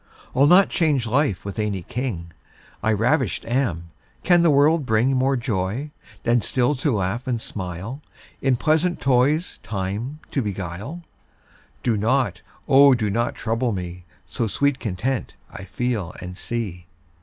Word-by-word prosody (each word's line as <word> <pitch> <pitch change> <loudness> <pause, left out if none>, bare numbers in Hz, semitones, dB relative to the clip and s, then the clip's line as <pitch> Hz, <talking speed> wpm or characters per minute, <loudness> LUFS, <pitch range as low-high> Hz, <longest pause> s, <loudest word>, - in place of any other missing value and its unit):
I'll 135 +2 +5
not 185 +4 +6
change 150 -8 +1
life 125 -4 0
with 100 +2 -5
any 100 -4 -1
king, 95 -8 -4 0.5
I 110 - +2
ravisht 120 +3 +1
am: 100 - -1 0.3
can 175 -1 +5
the 170 - +4
world 150 +2 +4
bring 125 +2 +2
More 135 +1 +2
joy, 115 +4 -2 0.3
than 120 0 +3
still 125 +5 +1
to 140 +2 0
laugh 105 +6 -2
and 120 -2 0
smile, 95 - -6 0.4
In 135 -1 +3
pleasant 160 +7 +1
toys 140 +6 +2
time 105 +7 -4
to 135 - 0
beguile? 100 - -5 0.8
Do 115 -3 +1
not, 110 -4 +1 0.3
O 140 0 +7
do 110 -4 -1
not 120 +4 0
trouble 115 +1 -1
me, 90 -1 -6 0.2
So 115 -4 -2
sweet 140 +5 +1
content 110 +5 -2 0.2
I 95 - -8
feel 105 -2 -2
and 90 0 -7
see. 95 -6 -4
120 Hz, 145 wpm, -23 LUFS, 100-135 Hz, 0.8 s, O